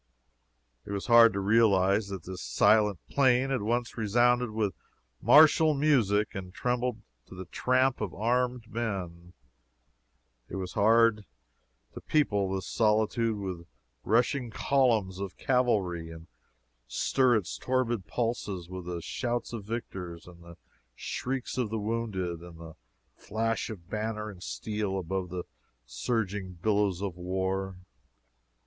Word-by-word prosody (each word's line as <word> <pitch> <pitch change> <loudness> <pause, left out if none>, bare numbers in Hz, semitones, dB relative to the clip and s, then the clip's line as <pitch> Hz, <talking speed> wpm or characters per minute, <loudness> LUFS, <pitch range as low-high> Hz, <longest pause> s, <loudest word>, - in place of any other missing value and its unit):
It - - -9
was 100 -1 -3
hard 115 -1 +7
to 100 - -2
realize 100 -1 +3
that 95 -4 -6
this 90 0 -7
silent 105 - +3
plain 130 -1 +3
had 130 - 0
once 120 +2 -2
resounded 120 +3 +3
with 105 -3 -1 0.5
martial 155 0 +6
music 120 -8 +2
and 95 -1 -6
trembled 125 +2 -2 0.2
to - - -12
the 95 0 -7
tramp 130 +7 +1
of 105 -5 -2
armed 125 +2 -1
men. 90 -7 -5 1.2
It - - -6
was 95 -1 -4
hard 110 0 +4 0.7
to - - -8
people 105 -11 +1
this 95 -2 -3
solitude 110 +1 +1
with 95 -4 -6 0.4
rushing 120 +2 +1
columns 110 -7 +1
of 100 -1 -6
cavalry, 100 -10 0
and 80 0 -10 0.6
stir 125 - +2
its 105 -5 -2
torpid 120 -6 -1
pulses 105 -6 -3
with 95 -1 -7
the 85 -2 -4
shouts 120 -1 -3
of 110 -4 -6
victors, 95 -7 -6
the 85 -1 -14 0.4
shrieks 130 - -4
of 120 -4 0
the 110 - -2
wounded, 105 -6 -2
and 85 -1 -12
the 80 -1 -10 0.4
flash 115 +2 -2
of 90 -7 -9
banner 110 0 -3
and 90 -3 -14
steel 105 0 -3
above 95 0 -3
the 90 0 -4 0.4
surging 95 - -2
billows 100 0 0
of 95 -4 -3
war. 95 +1 -2
105 Hz, 130 wpm, -29 LUFS, 95-120 Hz, 1.2 s, hard